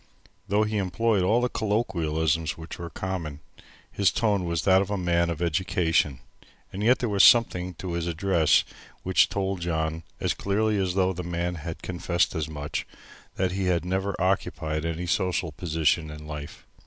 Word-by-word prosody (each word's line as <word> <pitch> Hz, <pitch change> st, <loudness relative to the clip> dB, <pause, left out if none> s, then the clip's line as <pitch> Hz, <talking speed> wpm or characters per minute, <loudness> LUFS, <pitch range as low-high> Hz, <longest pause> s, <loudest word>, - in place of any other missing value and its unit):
Though 105 Hz, +2 st, +2 dB
he 105 Hz, 0 st, -1 dB
employed 100 Hz, +2 st, +1 dB
all 110 Hz, +7 st, +3 dB
the 125 Hz, -, +2 dB
colloquialisms 85 Hz, -9 st, 0 dB
which 80 Hz, +2 st, -9 dB
were 85 Hz, 0 st, -5 dB
common, 85 Hz, -3 st, -4 dB, 0.5 s
his 100 Hz, -2 st, +3 dB
tone 105 Hz, -5 st, +1 dB
was 85 Hz, -2 st, -1 dB
that 95 Hz, +2 st, +5 dB
of 100 Hz, -, -3 dB
a 100 Hz, -, -1 dB
man 85 Hz, -2 st, +1 dB
of 85 Hz, 0 st, -2 dB
education, 80 Hz, -5 st, +1 dB, 0.5 s
and 95 Hz, -, -4 dB
yet 120 Hz, +4 st, +4 dB
there 120 Hz, -, -2 dB
was 100 Hz, -2 st, +3 dB
something 90 Hz, -7 st, +5 dB
in 95 Hz, -, -5 dB
his 85 Hz, 0 st, -2 dB
address 85 Hz, -1 st, +3 dB, 0.4 s
which 95 Hz, 0 st, +4 dB
told 95 Hz, -2 st, -2 dB
John 80 Hz, -1 st, -1 dB, 0.2 s
as -, -, 0 dB
clearly 105 Hz, +1 st, 0 dB
as 95 Hz, -2 st, -1 dB
though 95 Hz, -1 st, +2 dB
the 90 Hz, -, -5 dB
man 85 Hz, 0 st, -2 dB
had 80 Hz, 0 st, -7 dB
confessed 90 Hz, 0 st, 0 dB
as 80 Hz, -1 st, -2 dB
much, 75 Hz, -1 st, -4 dB, 0.5 s
that 95 Hz, -1 st, 0 dB
he 95 Hz, +1 st, -2 dB
had 90 Hz, -2 st, +1 dB
never 95 Hz, +2 st, -2 dB
occupied 80 Hz, -4 st, -1 dB
any 85 Hz, +1 st, -3 dB
social 90 Hz, -2 st, 0 dB
position 80 Hz, 0 st, 0 dB
in 75 Hz, 0 st, -9 dB
life. 75 Hz, -1 st, -8 dB
90 Hz, 175 wpm, -26 LUFS, 80-95 Hz, 0.5 s, that